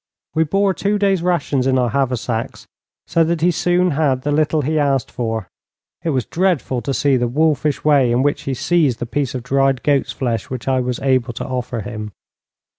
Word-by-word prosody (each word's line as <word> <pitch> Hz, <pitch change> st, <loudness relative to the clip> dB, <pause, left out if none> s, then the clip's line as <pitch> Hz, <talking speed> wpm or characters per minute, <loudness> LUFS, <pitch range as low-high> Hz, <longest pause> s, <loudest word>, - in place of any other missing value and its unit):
We 160 Hz, +1 st, +2 dB
bore 195 Hz, +4 st, +1 dB
two 200 Hz, +4 st, 0 dB
days' 195 Hz, -3 st, +2 dB
rations 145 Hz, -7 st, 0 dB
in 130 Hz, -1 st, +2 dB
our 125 Hz, -3 st, +1 dB
haversacks, 125 Hz, -3 st, -2 dB, 0.4 s
so 165 Hz, -, +2 dB
that 165 Hz, 0 st, -1 dB
he 175 Hz, +2 st, +4 dB
soon 175 Hz, +1 st, +1 dB
had 140 Hz, -4 st, +1 dB
the 145 Hz, -, -1 dB
little 150 Hz, 0 st, +1 dB
he 155 Hz, +3 st, 0 dB
asked 140 Hz, -3 st, 0 dB
for. 110 Hz, -5 st, -3 dB, 0.6 s
It 170 Hz, -, -1 dB
was 130 Hz, -6 st, 0 dB
dreadful 170 Hz, -8 st, 0 dB
to 130 Hz, -, -3 dB
see 135 Hz, 0 st, +2 dB
the 120 Hz, -1 st, 0 dB
wolfish 150 Hz, +2 st, +1 dB
way 140 Hz, -5 st, +4 dB
in 120 Hz, +2 st, +2 dB
which 145 Hz, 0 st, 0 dB
he 135 Hz, -, -1 dB
seized 150 Hz, -4 st, +1 dB
the 120 Hz, -, -4 dB
piece 135 Hz, +2 st, -2 dB
of 125 Hz, -, -4 dB
dried 135 Hz, 0 st, +1 dB
goat's 140 Hz, -2 st, +1 dB
flesh 115 Hz, -5 st, -3 dB
which 130 Hz, -1 st, -6 dB
I 130 Hz, -1 st, +2 dB
was 125 Hz, -1 st, -2 dB
able 130 Hz, -3 st, +1 dB
to 115 Hz, -, -5 dB
offer 125 Hz, -2 st, -3 dB
him. 105 Hz, -1 st, -6 dB
135 Hz, 200 wpm, -19 LUFS, 125-155 Hz, 0.6 s, he